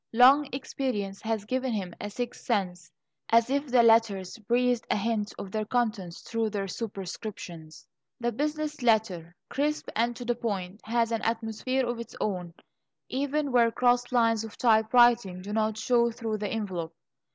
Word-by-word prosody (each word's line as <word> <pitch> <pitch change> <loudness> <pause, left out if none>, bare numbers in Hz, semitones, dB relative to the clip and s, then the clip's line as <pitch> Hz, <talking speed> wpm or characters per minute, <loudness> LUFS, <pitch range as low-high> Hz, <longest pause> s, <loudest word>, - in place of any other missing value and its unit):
Long 265 +5 +6
experience 250 -7 -3
has 220 -2 -2
given 255 +2 -1
him 190 -5 -3
a 205 - -4
sixth 240 +3 -5
sense, 180 -7 -1 0.4
as 230 +2 +4
if 280 +1 0
the 245 -2 +4
letters 225 -4 +3
breathed 240 +2 +1
a - - +2
hint 210 0 -1
of 195 - -7
their 215 +1 -1
contents 215 -6 -2
through 225 -1 -1
their 200 -2 -3
superscriptions. 185 -6 -7 0.3
The 240 0 0
business 300 +3 -2
letter, 205 -8 +1
crisp 300 +2 -1
and 235 +2 +1
to 245 - -7
the 240 - +1
point, 205 -4 -4
has 230 0 +1
an 230 - -1
atmosphere 230 +3 -1
of 240 -1 -3
its 235 - -8
own, 180 -5 -3 0.5
even 285 +2 -1
where 235 -2 +5
cross 245 +1 +2
lines 230 -2 +3
of 225 - -9
typewriting 225 -4 +4
do 205 +2 -5
not 220 0 0
show 235 +1 +3
through 225 -2 -4
the 210 - -2
envelope. 180 -7 -4
225 Hz, 165 wpm, -28 LUFS, 205-245 Hz, 0.5 s, Long